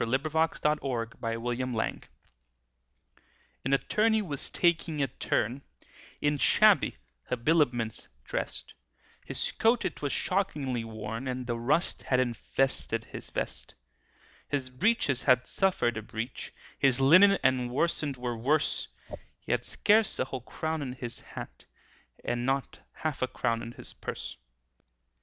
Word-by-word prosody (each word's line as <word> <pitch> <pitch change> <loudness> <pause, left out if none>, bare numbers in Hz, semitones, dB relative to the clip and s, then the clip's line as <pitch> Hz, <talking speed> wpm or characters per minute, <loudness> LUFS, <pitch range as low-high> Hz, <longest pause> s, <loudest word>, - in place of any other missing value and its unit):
THE - - -2
BRIEFLESS 160 +3 0
BARRISTER 135 -6 0
A 115 -1 -1
BALLAD 120 0 -2 1.6
N 135 - -1
Attorney 215 +9 +2
was 145 -7 -3
taking 170 -3 +1
a 140 - +3
turn, 120 0 -1 0.6
In 145 -1 +1
shabby - - +5 0.3
habiliments 125 -4 +1 0.2
drest; - - -4 0.5
His - - -1
coat 235 +2 +2
it - - -3
was 145 -2 -1
shockingly 145 - 0
worn, 115 +2 -5
And 125 0 -3
the 120 -1 -2
rust 145 +9 +2
had 130 - +1
invested 130 +2 0
his - - -8
vest. - - -4 0.7
His 135 -3 -2
breeches 140 - +2
had 125 -2 +5
suffered 180 - +1
a - - -2
breach, 110 +3 -5 0.3
His 135 -2 +4
linen 185 +9 +7
and 130 -2 +2
worsted 145 0 0
were 125 -1 -3
worse; 145 +7 +1 0.5
He - - -6
had - - +1
scarce 215 0 +3
a - - +1
whole 130 -1 -5
crown 160 +5 -3
in 130 -3 -4
his 120 -2 -6
hat, - - -10 0.6
And 120 0 -1
not 135 +1 -1
half 155 -3 -4
a 130 - +2
crown 115 -2 -1
in 115 0 -7
his 125 -2 -9
purse. - - -6
130 Hz, 135 wpm, -29 LUFS, 120-155 Hz, 1.6 s, linen